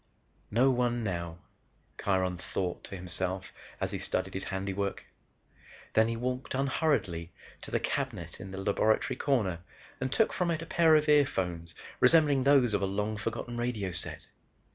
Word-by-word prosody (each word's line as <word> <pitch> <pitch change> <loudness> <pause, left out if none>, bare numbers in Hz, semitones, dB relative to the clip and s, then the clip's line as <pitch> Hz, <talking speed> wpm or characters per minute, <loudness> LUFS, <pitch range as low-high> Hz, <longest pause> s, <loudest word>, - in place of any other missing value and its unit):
"No 125 +5 +4
one 120 -1 +1
now," 85 -4 -3 0.6
Kiron 95 -2 +1
thought 90 -2 -3
to - - -7
himself 95 +1 -3 0.3
as - - -1
he - - -3
studied 95 +1 -2
his 95 - -4
handiwork. 100 +1 -3 0.9
Then 110 0 +5
he 115 0 -2
walked 125 +2 -3
unhurriedly 130 - 0 0.3
to - - -9
the - - +1
cabinet 110 - -3
in 95 - -7
the 95 - -7
laboratory 100 +3 +1
corner 105 - +1 0.4
and 130 0 -2
took 225 - +2
from 180 -2 0
it 165 -1 -1
a - - -7
pair 165 -1 +5
of 150 0 +3
earphones 90 - +2 0.2
resembling 150 -5 +5
those 135 -4 +5
of 100 - +1
a 100 - +1
long 105 +2 -1
forgotten 115 +2 -4
radio 115 -6 -1
set. 85 - -5
110 Hz, 160 wpm, -30 LUFS, 95-130 Hz, 0.9 s, Then